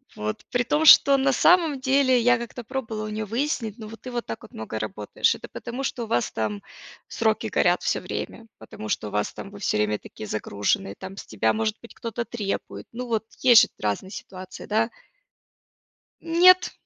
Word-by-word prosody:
Вот. 105 0 -4
При 245 -1 +1
том, 300 +6 +1
что 280 -2 +8
на 270 0 +2
самом 320 -1 +4
деле 265 -1 +3
я 245 +1 +4
как-то 235 +1 -7
пробовала 225 -3 -4
у 215 - -5
нее 215 0 -3
выяснить: 230 -1 -2
"Но 215 -2 -9
ты 250 +4 -9
вот 240 -1 -3
так 115 - -7
много 110 0 -6
работаешь. 105 -1 0
Это - - -10
потому 245 +3 -6
что 245 -3 -3
у - - -12
вас 120 - 0
там 105 -2 -3 0.5
сроки - - 0
горят - - +2
всё - - 0
время, - - -6
потому 110 - -9
что 105 - -2
у - - -13
вас 105 0 -1
там 195 - -9
вы 200 - -11
всё 175 - 0
время 105 0 0
такие 110 - -10
загруженные, 110 - -1
там 190 +1 -9
с - - -8
тебя, 110 +1 +1
может 215 -1 -1
быть, 235 - -13
кто-то 230 +1 -4
требует?" 210 -5 -5
Ну, 250 +1 -5
вот 225 -1 -1
есть 245 -2 +8
же 220 - +1
разные 105 - -3
ситуации, 185 -2 -9
да? 220 +2 +1 1.3
Нет, 355 +3 +5
220 Hz, 190 wpm, -25 LUFS, 185-255 Hz, 1.3 s, что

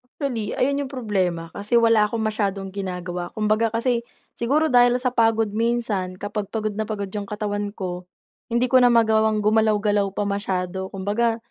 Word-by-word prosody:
Actually 235 -8 -3
ayun 280 +1 0
yung - - -14
problema, 185 -9 -2
kasi 205 +6 -1
wala 230 -2 +5
akong 225 +1 -3
masyadong 200 -3 -2
ginagawa. 180 -2 -4
Kumbaga 215 +1 +2
kasi 235 +1 +1 0.4
siguro 290 +6 +1
dahil 245 0 +5
sa 255 -1 0
pagod 225 -2 +2
minsan 220 -4 -1
kapag 205 +1 -4
pagod 215 -1 -2
na 215 +1 -3
pagod 200 -3 -4
yung 205 -1 -5
katawan 205 0 -3
ko, 180 -1 -5 0.4
hindi 240 +1 0
ko 260 - +7
na 245 - +6
magawang 220 -2 +3
gumalaw-galaw 210 -1 +2
pa - - 0
masyado. 190 -2 -2
Kumbaga 210 +4 0
215 Hz, 160 wpm, -23 LUFS, 200-230 Hz, 0.4 s, ko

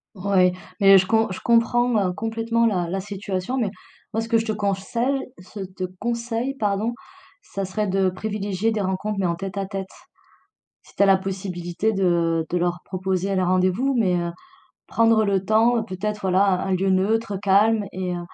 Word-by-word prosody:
Oui, 185 -1 +2 0.3
mais 195 -1 +8
je 185 - +3
com 220 +1 +2
je 185 - -5
comprends, 240 +1 +3 0.2
heu, - - -3
complètement 225 +2 0
la 180 -6 +1
la 190 +1 -2
situation. 200 +3 -4
Mais 225 -5 0 0.4
moi, 225 - 0
ce 225 - -6
que 230 - +4
je 225 - -1
te 220 - -1
consei 205 +3 -1 0.3
ce 200 +3 -11
te 185 -1 -6 0.2
conseille, 235 +2 -2
pardon, 210 +1 0 0.5
ça 195 -1 -5
serait 210 +2 -2
de 190 0 +2
privilégier 205 +2 -2
des 215 - -1
rencontres, 195 +2 -2
mais 190 - 0
en 170 -1 0
tête-à-tête. 195 +1 -4 1.0
Si - - -21
tu - - +2
as - - +6
la 195 - +6
possibilité 190 +1 -3
de 170 -4 +1
de 180 - 0
leur 175 0 -1
proposer 190 +1 -2
le 185 - +1
rendez-vous, 185 +9 +1
mais 185 -5 +2
heu, 170 -1 -1 0.6
prendre 225 -1 +3
le 195 -2 0
temps 225 +2 +3
peut-être, 210 +2 -4
voilà, 190 +1 +3
un 185 0 +1
un 190 - +2
lieu 190 +1 0
neutre, 205 +2 +1
calme 205 +2 +3
et, 185 -1 -3
heu, - - -4
195 Hz, 185 wpm, -23 LUFS, 185-220 Hz, 1.0 s, mais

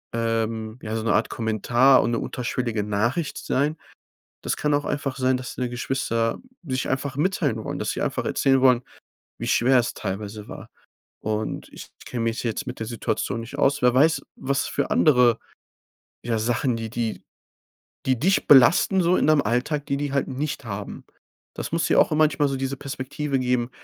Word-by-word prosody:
ähm, 115 0 -2
ja 110 0 -4
so 110 - -2
'ne 115 - +1
Art 110 - +1
Kommentar 120 +4 +3
und 115 - 0
'ne 115 - 0
unterschwellige 120 -3 -2
Nachricht 115 +10 -1
sein. 150 +4 -1 0.7
Das - - -1
kann 150 -1 0
auch 145 - +1
einfach 140 -2 -2
sein, 130 0 +2
dass 125 -1 -6
deine 125 -1 -3
Geschwister 120 -2 -1 0.3
sich 130 -4 -2
einfach 135 +1 -2
mitteilen 145 - 0
wollen, - - -4
dass - - -2
sie - - -3
einfach - - -2
erzählen 135 -1 +2
wollen, 125 -2 +4 0.6
wie - - -5
schwer 130 +2 +4
es 120 - -1
teilweise 105 +1 -5
war. - - -10 0.5
Und 110 0 -3
ich - - -11 0.2
kenne 120 -2 -3
mich 115 +1 -1
jetzt 115 -2 -2
mit - - -6
der 110 - -4
Situation 115 -1 -2
nicht 120 +5 -9
aus 140 0 +2
wer 125 0 +5
weiß, 145 +2 +3
was 140 +1 -1
für 140 - -2
andere 125 -6 +4 0.9
ja, 115 -1 -1
Sachen, 120 +2 0
die 115 -1 -5
die 115 -1 -3 0.8
die 130 -3 +2
dich 190 +6 +2
belasten 150 +8 +6
so 175 +2 +3
in - - +2
deinem 155 -2 +5
Alltag, 125 +6 -1
die 140 - -1
die 145 0 -3
halt 140 - 0
nicht 140 +1 -4
haben. 105 -2 -6 0.5
Das - - -5
muss 165 0 +1
dir - - +3
auch - - +3
manchmal 150 -2 +3
so 135 - -2
diese 135 +1 -3
Perspektive 140 +1 -3
geben, 125 -1 0
125 Hz, 185 wpm, -24 LUFS, 115-140 Hz, 0.9 s, belasten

